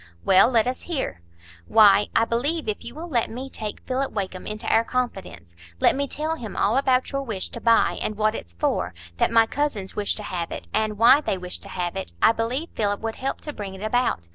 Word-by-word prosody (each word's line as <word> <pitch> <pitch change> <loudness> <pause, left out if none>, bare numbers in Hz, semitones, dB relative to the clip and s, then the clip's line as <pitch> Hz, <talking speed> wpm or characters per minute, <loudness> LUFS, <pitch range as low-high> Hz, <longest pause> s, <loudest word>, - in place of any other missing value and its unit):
"Well, 190 +4 +6
let 230 -4 +3
us 255 +1 -2
hear." 265 - -3 0.5
"Why, 210 -2 +6
I 225 - +4
believe, 285 +8 -1
if 215 - -3
you 235 - -8
will 330 +3 -6
let 245 -8 0
me 260 +3 -7
take 215 -2 -5
Philip 265 +1 -1
Wakem 190 -3 -4
into 215 +2 -5
our 225 - +4
confidence,—let 85 - -2
me 280 +1 -1
tell 310 +4 -2
him 225 -7 -7
all 210 +4 +2
about 260 -1 +2
your 275 -1 -1
wish 220 -8 -3
to 235 - -8
buy, 230 -1 +3
and 215 - -3
what 215 0 +2
it's 85 - -8
for; 85 0 -1 0.2
that - - +3
my 230 -1 +5
cousins 225 -7 -2
wish 205 -1 0
to 210 - -7
have 175 -4 -3
it, - - -6
and 215 -1 0
why 235 +6 +7
they 195 - -1
wish 180 0 -5
to - - -12
have 175 -1 -3
it,—I 85 - +2
believe 240 +8 -2
Philip 205 -1 -1
would 225 0 -4
help 270 +1 -3
to 300 - -6
bring 195 -5 -6
it 190 - -9
about. 215 - 0
225 Hz, 220 wpm, -24 LUFS, 195-255 Hz, 0.5 s, why